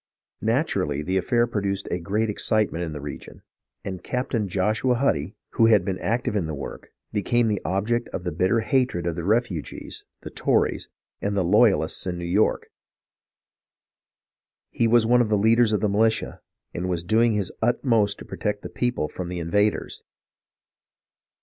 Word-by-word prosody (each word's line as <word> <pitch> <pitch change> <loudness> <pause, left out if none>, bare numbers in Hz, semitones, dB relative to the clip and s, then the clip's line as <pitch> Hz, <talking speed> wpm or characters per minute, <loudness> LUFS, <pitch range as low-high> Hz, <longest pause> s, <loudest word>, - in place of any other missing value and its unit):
Naturally, 100 - 0
the 95 +4 0
affair 120 +6 +2
produced 100 -4 -2
a 90 - -1
great 105 +6 -1
excitement 105 -4 0
in 80 - -4
the 75 - -6
region, 70 0 -9 0.4
and 95 -2 -5
Captain 125 -4 -2
Joshua 105 +7 +1
Huddy, 100 - 0 0.2
who 115 - +4
had 105 -5 +4
been 95 -1 -2
active 115 -1 -1
in 95 -6 0
the 80 - -4
work, - - -8 0.2
became 115 +3 +1
the 105 -3 0
object 110 +6 0
of 90 - -6
the 90 - -2
bitter 95 +8 +1
hatred 125 -8 0
of 85 -2 -1
the 85 - -4
refugees, 105 - -2 0.2
the - - -8
Tories, - - 0 0.3
and 100 0 -1
the 95 - +2
loyalists 95 -3 +3
in 90 -1 -2
New 85 - -5
York. 95 +5 +1 2.0
He 115 - +1
was 115 0 +4
one 125 +2 +4
of 115 - 0
the 105 - +3
leaders 115 +2 +4
of 105 - +1
the 105 - +2
militia, 110 +2 +1 0.3
and 90 +2 -3
was 85 -2 -1
doing 110 +5 +3
his 100 -4 -1
utmost 115 -3 +2
to - - -10
protect 105 -1 -3
the - - -6
people 125 -10 -1
from 90 +2 -6
the 90 - -4
invaders. 105 +5 0
105 Hz, 170 wpm, -24 LUFS, 90-115 Hz, 2.0 s, who